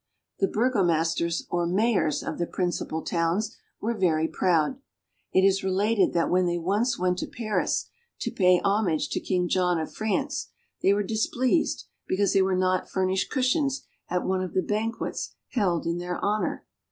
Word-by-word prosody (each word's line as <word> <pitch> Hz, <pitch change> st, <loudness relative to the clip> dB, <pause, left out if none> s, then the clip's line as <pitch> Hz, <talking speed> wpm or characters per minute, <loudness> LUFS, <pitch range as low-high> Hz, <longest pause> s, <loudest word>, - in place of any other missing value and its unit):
The 195 Hz, -, +3 dB
burgomasters 170 Hz, -8 st, +1 dB
or 175 Hz, -1 st, +1 dB
mayors 190 Hz, -5 st, +1 dB
of -, -, -5 dB
the 170 Hz, -, 0 dB
principal 175 Hz, -3 st, -2 dB
towns 175 Hz, +6 st, 0 dB, 0.2 s
were 230 Hz, +2 st, -1 dB
very 165 Hz, -6 st, +2 dB
proud. 180 Hz, -, +1 dB, 0.5 s
It 190 Hz, -, +4 dB
is 195 Hz, 0 st, +3 dB
related 200 Hz, +3 st, +2 dB
that 170 Hz, -1 st, +1 dB
when 180 Hz, 0 st, +3 dB
they 175 Hz, 0 st, 0 dB
once 210 Hz, +8 st, 0 dB
went 180 Hz, 0 st, 0 dB
to -, -, -3 dB
Paris 215 Hz, -3 st, -1 dB, 0.4 s
to -, -, -2 dB
pay 180 Hz, -2 st, +4 dB
homage 200 Hz, -6 st, +1 dB
to -, -, -1 dB
King 180 Hz, -1 st, 0 dB
John 180 Hz, -2 st, +2 dB
of 160 Hz, -, -5 dB
France 265 Hz, +7 st, -1 dB, 0.3 s
they 195 Hz, -, +4 dB
were 205 Hz, +1 st, +2 dB
displeased 240 Hz, -, 0 dB, 0.2 s
because 200 Hz, +1 st, +1 dB
they 195 Hz, -, +4 dB
were 190 Hz, 0 st, +2 dB
not 185 Hz, 0 st, +1 dB
furnished 190 Hz, 0 st, 0 dB
cushions 275 Hz, +1 st, +1 dB, 0.3 s
at 180 Hz, 0 st, -1 dB
one 185 Hz, 0 st, 0 dB
of 185 Hz, -, -5 dB
the 185 Hz, -, +2 dB
banquets 220 Hz, +2 st, -3 dB
held 190 Hz, -9 st, 0 dB
in 170 Hz, +1 st, -1 dB
their 180 Hz, 0 st, -3 dB
honor. 210 Hz, +1 st, -1 dB
190 Hz, 165 wpm, -26 LUFS, 175-215 Hz, 0.5 s, It